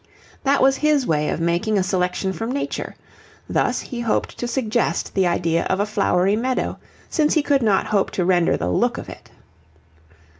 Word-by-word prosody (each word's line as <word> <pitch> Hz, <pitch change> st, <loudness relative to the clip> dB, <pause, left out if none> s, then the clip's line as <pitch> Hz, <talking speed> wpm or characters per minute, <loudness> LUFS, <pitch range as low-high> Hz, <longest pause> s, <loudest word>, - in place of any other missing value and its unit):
That 275 Hz, 0 st, +3 dB
was 270 Hz, 0 st, +4 dB
his 300 Hz, -3 st, +2 dB
way 150 Hz, -4 st, 0 dB
of -, -, -2 dB
making 175 Hz, +6 st, 0 dB
a 190 Hz, -, +2 dB
selection 185 Hz, 0 st, -1 dB
from 225 Hz, +5 st, -4 dB
nature; 280 Hz, -, -4 dB, 0.5 s
thus -, -, 0 dB
he 245 Hz, -, -7 dB
hoped 235 Hz, -2 st, -1 dB
to 245 Hz, -, -2 dB
suggest 235 Hz, -2 st, -1 dB
the 190 Hz, -2 st, +2 dB
idea 170 Hz, -1 st, +1 dB
of 190 Hz, -, 0 dB
a 205 Hz, -, +2 dB
flowery 200 Hz, -2 st, +1 dB
meadow, 255 Hz, +3 st, -2 dB, 0.3 s
since 305 Hz, -1 st, +1 dB
he 310 Hz, -, +3 dB
could 280 Hz, -2 st, +2 dB
not 210 Hz, -4 st, +2 dB
hope 205 Hz, -2 st, +1 dB
to 180 Hz, -, +1 dB
render 175 Hz, -2 st, +3 dB
the 90 Hz, +1 st, -2 dB
look 90 Hz, -, +1 dB
of -, -, -7 dB
it. -, -, -12 dB
210 Hz, 185 wpm, -21 LUFS, 180-255 Hz, 0.5 s, was